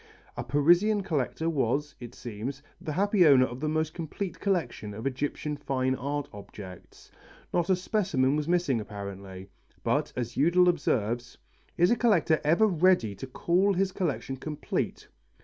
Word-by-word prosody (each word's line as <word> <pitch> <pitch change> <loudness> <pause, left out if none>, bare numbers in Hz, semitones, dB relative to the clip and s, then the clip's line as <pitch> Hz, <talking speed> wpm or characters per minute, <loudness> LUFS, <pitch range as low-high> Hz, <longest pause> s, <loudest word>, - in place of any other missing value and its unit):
A - - -4
Parisian 175 +8 +3
collector 160 -2 -1
was, 145 -1 0
it 120 0 -9
seems, 125 +5 -6 0.2
the 155 - -4
happy 200 +2 +3
owner 130 -3 +7
of 125 0 -7
the 155 +2 -1
most 155 0 -1
complete 175 +3 -5
collection 170 - -2
of 110 +4 -7
Egyptian 145 +3 -2
fine 130 -2 -1
art 140 +2 -3
objects. 100 -2 -11 0.4
Not 175 0 +1
a 190 - +5
specimen 180 -8 +1
was 150 0 -2
missing 170 -9 +1
apparently. 100 -2 -8 0.3
But, - - 0
as 120 -1 -4
Eudel 175 +5 +4
observes, 120 -7 -1 0.4
"Is 175 +5 +4
a - - +5
collector 190 -9 +3
ever 165 +8 +4
ready 180 - +3
to 135 - -8
call 175 +9 +2
his 190 +1 +1
collection 145 -7 -2
complete?" 150 +2 -4
145 Hz, 150 wpm, -28 LUFS, 125-175 Hz, 0.4 s, owner